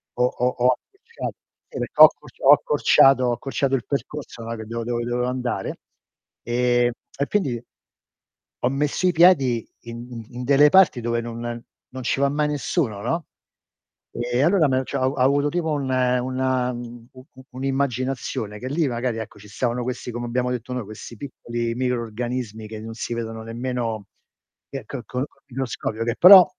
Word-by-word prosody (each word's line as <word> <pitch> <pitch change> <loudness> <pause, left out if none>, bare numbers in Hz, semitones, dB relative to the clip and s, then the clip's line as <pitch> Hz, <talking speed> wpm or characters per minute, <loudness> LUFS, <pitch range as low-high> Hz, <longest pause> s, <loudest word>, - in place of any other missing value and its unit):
ho 125 - +1
ho 125 0 0
ho 125 0 +3
accorciat 420 - -7 0.4
si - - -6
perchè - - 0
ho - - +15
accorc - - -18
ho - - +8
accorciato 135 - +5
ho 120 - +2
accorciato 135 +2 -1
il 125 - -3
percorso, 140 -3 -5
no, 115 +1 -4
che 110 - -7
devo 115 +1 -4
dove 120 0 -2
dovevo 120 +1 -1
andare, 125 -1 -3 0.6
ehm, 120 0 +2 0.3
e 140 - 0
quindi 135 - 0 1.0
ho 125 - +2
messo 145 +6 0
i - - +4
piedi 140 -9 +4
in 120 0 -8
in 125 +1 -6
delle 140 +3 +6
parti 185 -8 +5
dove 115 0 -1
non 120 0 -5 0.3
non 130 0 -7
ci 130 - 0
va 140 - +4
mai 150 +1 +1
nessuno, 145 - -1
no, 165 +7 -2 0.8
e 120 +1 -1
allora 170 -1 +4
me 130 0 +1
cio 140 - -3
ho 130 +1 +1
avuto 140 +3 +3
tipo 165 -1 -1
un 140 -3 -1
una 130 0 +1
u 120 -1 -8 0.3
u 130 - -14
un'immaginazione, 130 -5 -2
che 125 - -5
lì 155 +1 +1
magari, 120 -1 -2
ecco, 110 - -8
ci 105 - -14
stavano 120 +3 -1
questi, 125 0 -4
come 120 +1 -4
abbiamo 125 +1 0
detto 125 +1 -4
noi, 125 - -2
questi 110 +3 -9
piccoli 120 -2 -4
microrganismi 120 -2 -3
che 110 0 -7
non 115 +1 -7
si 120 - -4
vedono 115 -1 -5
nemmeno 115 -2 -3 0.6
che 135 -3 -6
che 130 0 -6
col 125 +2 -2
col - - -32
microscopio, 120 -3 -3
che 120 - 0
però 185 0 +10
125 Hz, 175 wpm, -23 LUFS, 120-135 Hz, 1.0 s, ho